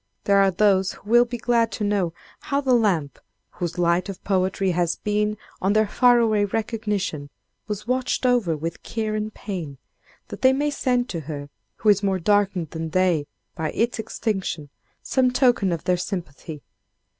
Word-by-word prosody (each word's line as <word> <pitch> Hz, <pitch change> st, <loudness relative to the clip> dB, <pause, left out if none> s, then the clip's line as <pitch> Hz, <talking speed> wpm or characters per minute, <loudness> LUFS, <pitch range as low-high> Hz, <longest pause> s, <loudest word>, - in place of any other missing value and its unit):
There 200 Hz, -1 st, +4 dB
are 195 Hz, 0 st, +5 dB
those 190 Hz, 0 st, +2 dB
who 210 Hz, -, -11 dB
will 240 Hz, +1 st, +6 dB
be 240 Hz, 0 st, -5 dB
glad 235 Hz, -1 st, +1 dB
to 215 Hz, -, -3 dB
know 200 Hz, -4 st, +1 dB, 0.3 s
how 280 Hz, -, -1 dB
the 265 Hz, -3 st, +1 dB
lamp, 190 Hz, -, +1 dB, 0.3 s
whose 175 Hz, 0 st, -4 dB
light 175 Hz, +2 st, +1 dB
of 195 Hz, -, -8 dB
poetry 190 Hz, 0 st, +1 dB
has 175 Hz, -1 st, 0 dB
beamed 210 Hz, 0 st, -1 dB, 0.2 s
on 195 Hz, +2 st, +2 dB
their 215 Hz, 0 st, +4 dB
far 245 Hz, +3 st, +4 dB
away 215 Hz, -3 st, +3 dB
recognition, 205 Hz, -8 st, -2 dB, 0.4 s
was 210 Hz, -1 st, -4 dB
watched 255 Hz, +1 st, 0 dB
over 235 Hz, -11 st, +2 dB
with 165 Hz, +3 st, -5 dB
care 220 Hz, -1 st, -3 dB
and 215 Hz, 0 st, -2 dB
pain, 175 Hz, -11 st, -6 dB, 0.5 s
that -, -, -8 dB
they 260 Hz, 0 st, +6 dB
may 290 Hz, +2 st, 0 dB
send 250 Hz, -3 st, 0 dB
to 170 Hz, -, -3 dB
her, 145 Hz, -2 st, -5 dB, 0.3 s
who 215 Hz, -, +1 dB
is 205 Hz, -1 st, +5 dB
more 195 Hz, -2 st, +1 dB
darkened 190 Hz, -3 st, +1 dB
than 160 Hz, 0 st, -4 dB
they 170 Hz, -4 st, +1 dB, 0.3 s
by 160 Hz, -2 st, -3 dB
its 235 Hz, 0 st, 0 dB
extinction, 195 Hz, -, -3 dB, 0.3 s
some 260 Hz, -1 st, +2 dB
token 245 Hz, -6 st, +2 dB
of 165 Hz, -3 st, -3 dB
their 180 Hz, -1 st, +1 dB
sympathy. 165 Hz, -5 st, -6 dB
200 Hz, 175 wpm, -23 LUFS, 175-225 Hz, 0.5 s, will